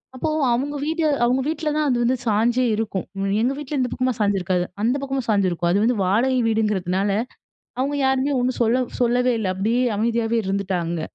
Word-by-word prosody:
அப்போ 285 +5 -2 0.2
அவங்க 280 +5 -2
வீடு 320 +2 -1 0.2
அவங்க 255 +2 +2
வீட்ல 315 0 -1
தான் 305 -1 +1
அது 250 - +2
வந்து 245 +2 +2
சாஞ்சே 235 +4 +2
இருக்கும். 210 -4 -3
அ - - -2 0.2
எங்க 250 +4 +1
வீட்ல 295 0 -4
இந்த 250 -1 0
பக்கமா 255 0 0
சாஞ்சிருக்காது 190 -3 +1 0.2
அந்த 230 +3 +2
பக்கமா 270 -1 -2
சாஞ்சிருக்கும். 185 -5 +1
அது 185 - +2
வந்து 240 +2 +2
வாடகை 245 +7 +2
வீடுங்றதுனால 205 -3 0 0.7
அவங்க 280 +3 0
யாருமே 265 +1 +1
ஒண்ணு 250 +1 +1
சொல்ல 235 +2 +3 0.2
சொல்லவே 250 +1 +2
இல்ல 215 -3 -2
அப்டியே 225 +6 +1
அமைதியாவே 230 +1 0
இருந்துட்டாங்க. 185 -4 -2
235 Hz, 170 wpm, -22 LUFS, 200-260 Hz, 0.7 s, சொல்ல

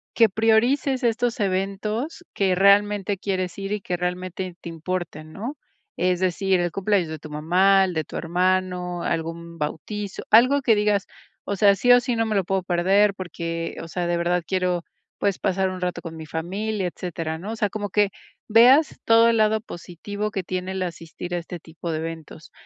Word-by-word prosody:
que 230 - +6
priorices 240 +6 +2
estos 235 0 0
eventos 210 - -2
que 190 -2 +1
realmente 200 0 +3
quieres 185 -3 -2
ir 195 +1 -4
y 210 - -3
que 180 - -2
realmente 180 0 -4
te 170 - -8
importen, 165 -2 -5
¿no? 240 +9 -5 0.4
Es 180 0 +1
decir, 190 0 +1
el 175 -1 -1
cumpleaños 195 -3 0
de 160 -2 -6
tu 155 - -10
mamá, 185 +6 +3
el 180 - -3
de 160 -3 -2
tu - - -11
hermano, 180 0 0
algún 165 0 -4
bautizo 195 +7 -4
algo 255 +6 +6
que 230 -3 +4
digas: 210 -1 +1 0.4
"O 200 - -3
sea, 200 0 +5
sí 245 +6 +3
o 245 - +8
sí, 245 -1 -2
no 225 0 +1
me 215 -1 -1
lo 195 - +2
puedo 190 0 0
perder 190 +3 +3
porque, 165 -2 -5
o - - -8
sea, 175 0 -2
de 175 - +1
verdad 175 0 0
quiero, 180 -2 0 0.3
pues 200 -2 0
pasar 190 -1 +1
un 185 -1 -6
rato 180 -1 -2
con 165 -2 -8
mi 160 -1 -8
familia". 190 +5 -3
Etcétera, 165 -2 -4
¿no? 195 +6 -6
O 225 - -3
sea, 210 -3 +1
como 205 0 -4
que 205 +1 +2 0.4
veas 250 +7 +6
todo 230 0 +6
el 230 -1 +3
lado 215 0 +3
positivo 205 +2 -6
que 195 -3 -3
tiene 185 +1 -4
el 190 -1 -2
asistir 175 0 -6
a - - 0
este 175 0 -6
tipo 165 +1 -7
de 155 - -1
eventos. 160 -1 -8
185 Hz, 195 wpm, -24 LUFS, 175-210 Hz, 0.4 s, o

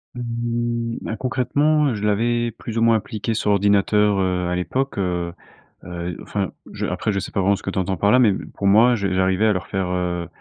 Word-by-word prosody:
Mmh 120 -1 -2
ben, 115 - -4
concrètement, 140 +2 +1
je 105 - -6
l'avais 120 +3 +1
plus 115 0 -7
ou 115 - +2
moins 115 -1 +5
appliqué 110 +1 -4
sur 105 -1 -1
ordinateur, 100 0 +3
heu, 90 -1 0
à 90 - -1
l'époque, 130 +10 -2
heu. 90 -2 -2 0.5
Heu, 85 -1 -5
enfin, 100 -2 -3 0.2
je - - -3
après 105 - -1
je 100 - -1
sais 100 - -5
pas - - -1
vraiment 100 +2 +3
ce - - -12
que - - -6
tu 95 - -3
entends 95 0 -1
par 100 - +3
là. 125 - +5
Mais 120 -4 +5
m 95 - -4
pour 100 - -3
moi, 115 +5 +6
je 100 -4 -1
j'arrivais 95 +2 +2
à 110 - +4
leur 90 -3 -3
faire, 95 -1 -2
heu, 90 -1 -2
105 Hz, 225 wpm, -21 LUFS, 95-115 Hz, 0.5 s, moi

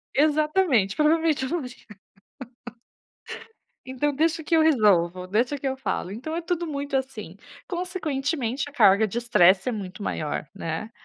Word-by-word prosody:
Exatamente, 300 - +2
provavelmente 310 -2 +2
eu 260 - -3
não 330 -5 -2
ia. 250 - -9 2.1
Então, 265 +3 -1
deixa 320 +2 0
que 330 - 0
eu 325 - +5
resolvo, 190 - +3
deixa 235 +9 0
que 275 - -5
eu 265 0 -1
falo, 215 -7 -3
então 260 +11 -5
é 340 - -3
tudo 345 0 -2
muito 285 -2 -3
assim. 230 -9 -5 0.3
Consequentemente 295 - -3
a - - -14
carga 215 -5 +5
de 215 - -7
estresse 190 -4 +4
é - - -1
muito 195 -2 -7
maior, 150 -5 -3
né, 165 +7 -5
265 Hz, 150 wpm, -24 LUFS, 210-310 Hz, 2.1 s, eu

